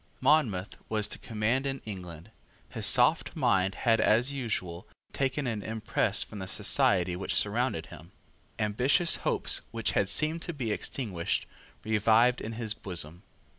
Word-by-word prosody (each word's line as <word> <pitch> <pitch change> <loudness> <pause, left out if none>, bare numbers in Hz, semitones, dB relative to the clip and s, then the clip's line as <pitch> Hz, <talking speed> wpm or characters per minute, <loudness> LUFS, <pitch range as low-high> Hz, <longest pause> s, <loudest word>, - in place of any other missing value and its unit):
Monmouth 130 -10 +1
was 110 -1 0
to - - -8
command 115 +5 -1
in 135 0 -3
England. 90 -2 -8 0.4
His - - -1
soft - - +4
mind 95 0 +1
had 115 -2 +4
as 120 +6 +3
usual, 95 -10 -4 0.3
taken 135 +1 -1
an 115 -4 -2
impress 105 -1 0
from 105 - -10
the 95 - -6
society 90 -1 +2
which 95 - -3
surrounded 105 -5 +1
him. - - -13 0.5
Ambitious 125 +11 +1
hopes, - - 0
which 115 -2 -2
had 100 - +1
seemed 155 +2 +1
to 175 - -5
be 125 -7 -3
extinguished, 100 -6 -2 0.4
revived 110 +3 +3
in 115 - -5
his 110 -2 -1
bosom. 90 -5 -1
110 Hz, 145 wpm, -29 LUFS, 95-125 Hz, 0.5 s, soft